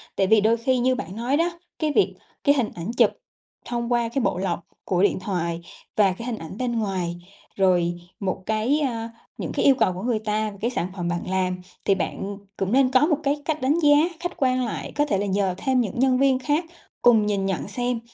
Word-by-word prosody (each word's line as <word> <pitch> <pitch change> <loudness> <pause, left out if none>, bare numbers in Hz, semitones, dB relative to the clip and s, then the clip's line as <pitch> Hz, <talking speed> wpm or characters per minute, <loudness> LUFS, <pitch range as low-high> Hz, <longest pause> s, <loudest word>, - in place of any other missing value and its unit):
Tại 195 - +2
vì 220 +1 +5
đôi 225 +2 +3
khi 255 +3 +1
như 255 +1 +2
bạn 190 -5 -6
nói 245 +5 0
đó, 340 +1 0 0.2
cái 310 -2 +1
việc 405 - +2 0.3
cái 285 0 +5
hình 245 -6 +1
ảnh 175 +5 -4
chụp - - +6 0.6
thông 235 0 -3
qua 235 -1 +1
cái 270 +3 -1
bộ 230 - 0
lọc 180 -2 -1 0.3
của 185 0 +1
điện 205 - +2
thoại 170 -3 -2 0.4
và 200 -3 +5
cái 230 +6 -8
hình 235 -3 -2
ảnh 165 +2 -8
bên 240 -2 -1
ngoài, 185 -5 -2 0.4
rồi 180 -3 +3 0.3
một 190 -1 -3
cái, 220 +7 +1
a 230 -5 -2 0.3
những - - -4
cái - - 0
yêu 275 - +7
cầu 185 -8 +2
của 180 - -6
người 235 -2 +1
ta 215 0 -1
về 200 - -12
cái 235 +3 0
sản 180 - -1
phẩm 175 -3 -3
bạn 175 +1 -3
làm, 185 -1 0 0.2
thì 195 - +4
bạn 195 +1 -3 0.2
cũng 195 0 -1
nên 260 +1 +4
có 265 +2 +5
một 310 -4 +2
cái 290 +1 0
cách 310 0 -1
đánh 285 +6 +2
giá 295 -3 +6 0.2
khách 350 +1 -3
quan 255 -1 +2
lại. 230 - -5
Có 295 - +2
thể 240 -9 0
là 200 - -1
nhờ 195 -2 0
thêm 260 +2 +1
những 225 0 -3
nhân 260 0 +4
viên 270 -1 +4
khác 295 +5 0 0.4
cùng 225 -3 +5
nhìn 200 -2 0
nhận 190 -2 -2
xem 245 +3 -1
225 Hz, 235 wpm, -24 LUFS, 190-260 Hz, 0.6 s, yêu